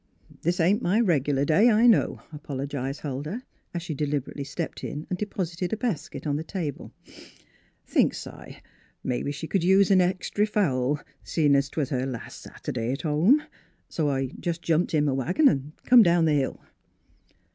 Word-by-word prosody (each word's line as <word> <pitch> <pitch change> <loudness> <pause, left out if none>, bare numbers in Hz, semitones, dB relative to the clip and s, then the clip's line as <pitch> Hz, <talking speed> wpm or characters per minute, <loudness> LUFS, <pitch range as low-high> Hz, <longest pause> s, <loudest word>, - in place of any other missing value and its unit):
" - - -23
This 175 +2 0
ain't 190 +7 +3
my 205 0 +2
regular 145 - +2
day, 165 +11 +5
I 225 +1 +4
know," 235 -3 +3
apologised 140 -1 -4
Huldah, 150 - -4 0.3
as 170 -1 -4
she 175 - -4
deliberately 145 -1 -3
stepped 160 +3 -5
in 150 - -5
and 180 - -2
deposited 180 -3 -3
a - - 0
basket 175 - -3
on 145 -1 0
the 155 - -4
table. 165 -6 -5 0.5
" - - -35
Thinks - - +1
s' - - -9
I, - - -13 0.4
mebbe 125 +3 -2
she 150 +3 -6
c'd 185 +2 0
use 190 +2 +4
an 190 -1 +6
extry 185 +3 0
fowl, 145 -9 +1 0.2
seein' 150 -4 +2
'twas 140 0 0
her 130 -2 -1
las' 125 -4 -7 0.2
Sunday 120 +2 -2
t' - - -9
home. 185 - +4 0.5
So 155 -3 0
I 135 -1 -1
jes' 170 -1 -1
jumped 165 0 0
in 150 -1 +2
m' 135 - +1
wagon 180 - +3
an' 145 - 0
come 245 -1 +8
down 170 -4 +4
the 155 - +3
hill." 140 -2 0
155 Hz, 180 wpm, -26 LUFS, 140-185 Hz, 0.5 s, come